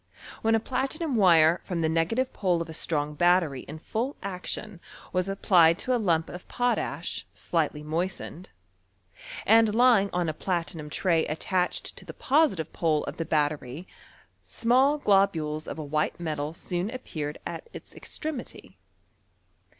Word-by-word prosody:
AVhen 225 0 +4
a - - +3
pla 260 +4 -1
tinum 310 0 -3
wire 170 -6 +5
from 175 -3 -3
the 160 - +2
negative 165 +11 0
pole 180 -4 +1
of 170 - -3
a 160 - -8
strong 150 -2 -1
battery 170 -4 +2
in 150 - -7
full 235 - -3
action 190 0 -5 0.3
was 185 +1 0
applied 175 -4 +4
to 255 - -1
a 240 - 0
lump 165 -5 +1
of 180 - -9
potash, 245 0 -1
slightly 150 -3 -1
moistened, 175 +2 -4 1.0
and 225 +1 +6
lymg 235 -5 +5
on 175 -1 0
a 155 - -1
platinum 165 -3 -3
tray 165 0 +1
attached 180 +4 -1
to - - -8
tlie - - -10
positive 270 - +2
pole 155 -3 +1
of - - -6
the 165 - -2
battery, 150 0 -1 0.5
small 260 +5 +2
globules 175 - +1
of - - -5
a 155 - -4
white 150 +3 -1
metal 155 -3 -3
soon 175 +3 -3
appeared 155 - -5
at - - -6
its - - -10
extremity. 305 -6 -6
175 Hz, 150 wpm, -27 LUFS, 160-220 Hz, 1.0 s, and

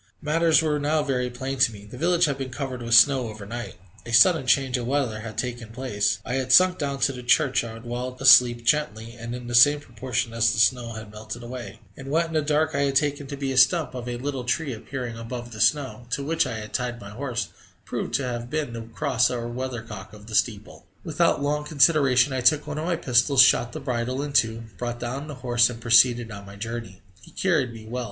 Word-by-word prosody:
Matters 160 +1 +2
were 150 -2 0
now 150 +1 0
very 125 -3 -1
plain 130 +2 -5
to 125 -2 +4
me: 105 -1 -12
the 105 - -12
village 175 +5 +2
had 140 -3 -2
been 135 -1 -4
covered 130 -1 -5
with 115 0 +2
snow 130 0 +5
overnight; 110 +2 -7 0.3
a 115 - -9
sudden 130 +4 +5
change 130 +1 +2
of 120 -2 -3
weather 130 -5 -1
had 110 -1 -8
taken 120 -3 -4
place; 105 -5 -1
I 125 - -4
had 130 -1 -2
sunk 185 +5 +6
down 140 -2 -3
to - - +3
the 125 -2 -8
church 130 0 +2
yard 115 0 -9
whilst 125 +1 -5
asleep, 120 -2 +6
gently, 115 -5 0
and 120 0 -7
in 125 0 -8
the 120 - -6
same 145 +5 +6
proportion 120 -2 -4
as 115 0 +2
the - - -4
snow 120 0 +2
had 110 -1 -9
melted 110 +2 -8
away; 120 -2 -8
and 135 - -10
what 165 +4 +1
in 165 - -9
the 155 - +2
dark 155 +1 0
I 140 - -1
had 135 -1 -1
taken 145 0 0
to 140 - -7
be 135 -1 -3
a 130 - -3
stump 155 +5 +3
of 125 -1 -6
a 120 - -4
little 135 0 -4
tree 135 +3 -2
appearing 120 0 -6
above 120 +1 -7
the 110 -1 -6
snow, 130 -3 0
to 140 - -1
which 160 0 0
I 115 -3 -4
had 105 0 -9
tied 120 -1 -3
my 100 -2 -10
horse, 125 +1 -4 0.4
proved - - -4
to 140 - 0
have 120 -1 -4
been 150 -4 -3
the 115 - -6
cross 115 +2 0
or 120 -1 -4
weathercock 120 -5 -6
of 105 -1 -13
the 110 - -11
steeple! 105 -1 -2 0.2
Without 160 -2 +1
long 150 +1 -1
consideration 140 -3 +3
I 130 - -2
took 145 +4 +3
one 150 0 -5
of 155 - -4
my 175 0 0
pistols, 130 -1 +4
shot 120 -1 +3
the 155 - -6
bridle 130 0 -3
in 145 -1 -6
two, 115 -3 +1 0.2
brought 120 -1 -4
down 130 +5 -5
the 150 - -7
horse, 120 -1 +3
and 120 -2 -8
proceeded 120 0 +4
on 100 -1 -9
my 100 - -11
journey. 110 -2 -7 0.2
He - - -16
carried 165 -10 0
me 115 -1 -11
well. 120 +3 -5
125 Hz, 235 wpm, -24 LUFS, 115-140 Hz, 0.4 s, sunk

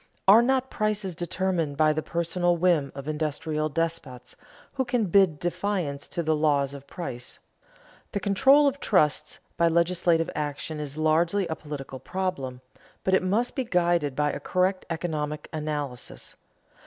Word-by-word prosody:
Are 210 +4 +9
not 260 +1 +1
prices 210 -3 -1
determined 175 -3 -2
by 155 -1 +4
the 155 - -1
personal 175 +1 0
whim 170 -5 +2
of 140 +1 -7
industrial 155 0 -2
despots 155 -5 -3 0.4
who 265 - 0
can 245 -3 0
bid 185 -4 +4
defiance 175 -5 -2
to 170 - -3
the 155 0 +2
laws 145 -2 +1
of 140 0 -10
price? 125 -9 -7 0.8
The 200 - 0
control 265 +9 +5
of 280 0 +1
trusts 155 - +1 0.2
by 170 - +4
legislative 170 0 +2
action 150 +1 -4
is 150 0 -5
largely 165 +5 +2
a 160 - -1
political 140 -4 -7
problem, 140 -10 -3 0.4
but 190 - +1
it 190 - +5
must 210 +7 0
be 265 - 0
guided 175 - +1
by 150 +1 +1
a - - -5
correct 185 +1 0
economic 155 -3 -3
analysis. 150 -5 -5
165 Hz, 150 wpm, -26 LUFS, 150-185 Hz, 0.8 s, Are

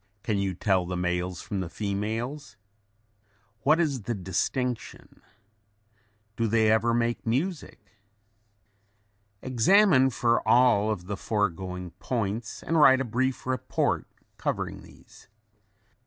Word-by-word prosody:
Can 105 -2 0
you 95 -2 -1
tell 95 -1 +1
the 90 0 -3
males 90 0 -2
from 100 - -4
the 90 -3 -4
females? 110 - -4 1.0
What 150 +9 +3
is 145 -7 0
the 115 +3 -3
distinction? 110 +6 -3 1.1
Do 115 - 0
they 110 0 +3
ever 110 +2 +3
make 120 0 0
music? 140 - -3 1.4
Examine 135 - +4
for 120 -1 +1
all 110 -4 +4
the 95 +2 -7
foregoing 90 -4 -2
points 110 -2 -3
and 165 -1 +1
write 130 -3 +7
a 135 - -1
brief 130 +3 -1
report 130 0 -1 0.3
covering - - -3
these. - - -18
115 Hz, 110 wpm, -27 LUFS, 100-130 Hz, 1.4 s, write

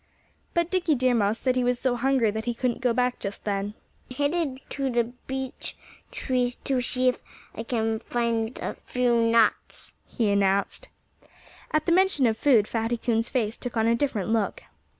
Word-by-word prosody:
But 340 0 +1
Dickie 350 -5 +2
Deer 255 -1 +2
Mouse 215 -1 +2
said 255 0 0
he 255 - +1
was 245 0 +1
so 245 0 0
hungry 250 -3 +2
that 220 +1 -4
he 240 -1 -1
couldn't 240 -1 -1
go 250 -1 +2
back 250 +1 0
just 200 0 -5
then. 205 0 -2 0.3
"I'm 255 - -8
headed 285 -1 0
for 275 -1 -1
the 240 -1 +2
big 235 +2 -11
beech 265 -1 -4 0.3
tree 250 -1 -1
to 265 -2 0
see 255 +1 +3
if 250 - -3 0.3
I - - -5
can 225 -1 -1
find 235 0 -1
a - - -2
few 245 -2 0
nuts," 230 -1 +1
he 220 -5 0
announced. 200 0 +1 0.8
At 310 0 0
the - - +1
mention 370 -6 +4
of 225 -2 +2
food 225 -4 +4
Fatty 230 +1 -1
Coon's 230 0 0
face 225 -4 -1
took 245 -2 -5
on 220 - +2
a 230 - +4
different 230 -5 -1
look. 220 -3 0
240 Hz, 190 wpm, -26 LUFS, 225-260 Hz, 0.8 s, mention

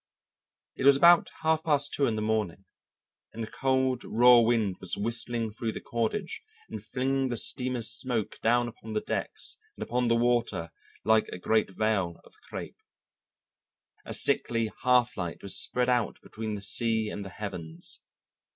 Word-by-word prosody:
It 135 - +1
was 140 -1 +8
about 170 +3 +6
half 160 0 +2
past 145 -2 +1
two 140 - +2
in 110 - 0
the 110 - -2
morning, 105 -4 -1 0.7
and 115 - -5
a 110 - -7
cold 130 -1 +1
raw 120 +1 +6
wind 115 -5 +2
was 90 - -2
whistling 115 +1 -2
through 110 +1 -3
the - - -5
cordage 120 - -3 0.3
and - - -6
flinging 135 +1 -1
the 120 - 0
steamer's 125 -1 0
smoke 120 -5 -3
down 120 +1 +3
upon 110 -1 -9
the 105 - 0
decks - - -3 0.2
and - - -4
upon 125 0 0
the 115 - +3
water 120 -8 0 0.3
like 110 0 +4
a - - -7
great 110 +4 +1
veil 95 -4 -1
of - - -20 0.2
crêpe. - - -6 1.3
A - - -8
sickly 115 -2 0
half 125 -1 +3
light 85 -3 -4
was 100 -2 -2
spread 125 0 +1
out 125 -3 +1
between 110 -1 -5
the 100 - -6
sea 110 +1 0
and 100 - -5
the 95 - -7
heavens. 90 -5 -7
115 Hz, 165 wpm, -28 LUFS, 105-125 Hz, 1.3 s, was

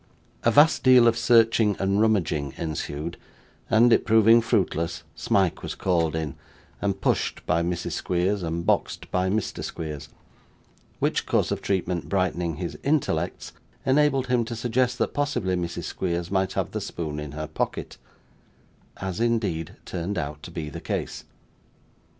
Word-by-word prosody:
A - - +3
vast 145 +8 +5
deal 125 -2 +7
of 115 - +4
searching 115 -3 +4
and 100 +2 +1
rummaging 85 -10 +1
ensued, 80 0 -4 0.5
and 115 +2 +5
it - - +3
proving 115 +1 +6
fruitless, 85 -7 0
Smike 95 -4 +1
was - - -5
called 85 -4 +1
in, 80 -4 -2 0.5
and 100 -1 -1
pushed - - -1
by 85 - +2
Mrs. 85 0 -2
Squeers, 95 +3 0
and 85 0 -3
boxed - - 0
by 90 0 +1
Mr. 105 +1 -2
Squeers; 75 -2 -6 0.9
which - - 0
course - - +1
of - - -2
treatment 90 -3 -1
brightening 90 -4 0
his 85 +2 -5
intellects, 150 0 -1 0.3
enabled 135 0 +3
him 125 -2 +2
to 115 - -5
suggest 125 +2 0
that - - -1
possibly 145 -11 0
Mrs. 85 -1 -3
Squeers 85 -1 -3
might 95 -1 +1
have - - -2
the - - -3
spoon 75 -3 -4
in 75 -1 -6
her 75 +1 -4
pocket, 80 - -4 1.0
as 95 -2 -4
indeed 110 -9 0
turned 90 +3 -4
out 75 -2 -4
to - - -9
be 80 -2 -5
the - - -7
case. - - -4
95 Hz, 150 wpm, -25 LUFS, 85-115 Hz, 1.0 s, deal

